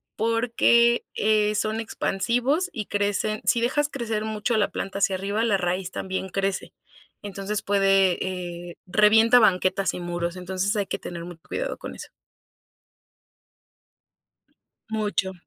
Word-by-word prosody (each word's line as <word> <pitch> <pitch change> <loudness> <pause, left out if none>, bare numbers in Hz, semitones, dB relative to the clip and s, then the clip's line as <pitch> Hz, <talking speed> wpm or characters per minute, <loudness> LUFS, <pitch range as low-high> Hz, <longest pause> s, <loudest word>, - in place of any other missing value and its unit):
porque, 235 +1 +3
eh, 215 0 +2
son 215 +1 -1
expansivos 245 - 0
y 210 -3 -4
crecen 205 +1 -1
sí 235 - +3
dejas 290 +5 +1
crecer 225 -6 -3
mucho 220 +2 -1
la 205 - +2
planta 195 0 -4
hacia 195 -1 +2
arriba, 200 +4 -1
la 210 -4 +2
raíz 180 +1 -2
también 190 0 -4
crece. 195 +1 -2 0.5
Entonces, 200 0 -4
puede, 195 -2 +3 0.5
eh, - - -13
revienta 220 +5 +5
banquetas 190 -2 +2
y - - -5
muros, 175 0 -3
entonces 190 +3 -2
hay 205 -2 0
que - - -3
tener 170 -1 -7
mucho 175 -2 -11
cuidado - - -3
con - - -8
eso. - - -11 2.8
Mucho. 210 -3 -1
205 Hz, 130 wpm, -25 LUFS, 190-225 Hz, 2.8 s, revienta